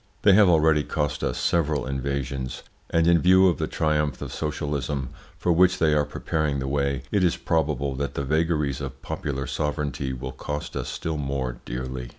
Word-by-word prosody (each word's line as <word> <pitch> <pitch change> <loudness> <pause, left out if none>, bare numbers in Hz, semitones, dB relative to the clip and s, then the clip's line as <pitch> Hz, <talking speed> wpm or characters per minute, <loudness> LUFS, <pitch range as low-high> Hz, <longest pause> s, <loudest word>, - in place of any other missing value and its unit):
They 100 - +7
have 100 -1 +6
already 80 -2 +4
cost 75 -2 -2
us - - -1
several 75 -5 +1
invasions, 70 -1 -3 0.3
and 80 0 +2
in 85 0 +5
view 95 +1 +6
of 90 - +1
the - - 0
triumph 75 -3 0
of - - -6
socialism, 75 -3 -2 0.3
for 90 - +1
which 90 +2 +4
they 80 -2 +3
are 75 -1 +3
preparing 75 0 -1
the 65 0 -3
way, 70 -2 0
it 100 -3 +2
is 90 - +2
probable 75 -3 0
that 70 +1 -3
the 70 - -1
vagaries 75 -1 0
of 65 -1 -7
popular 70 -2 -3
sovereignty 75 -3 -2
will 65 - -5
cost 75 0 -5
us - - -3
still 80 -1 -3
more 70 -4 -3
dearly. 65 0 -5
75 Hz, 180 wpm, -25 LUFS, 70-80 Hz, 0.3 s, They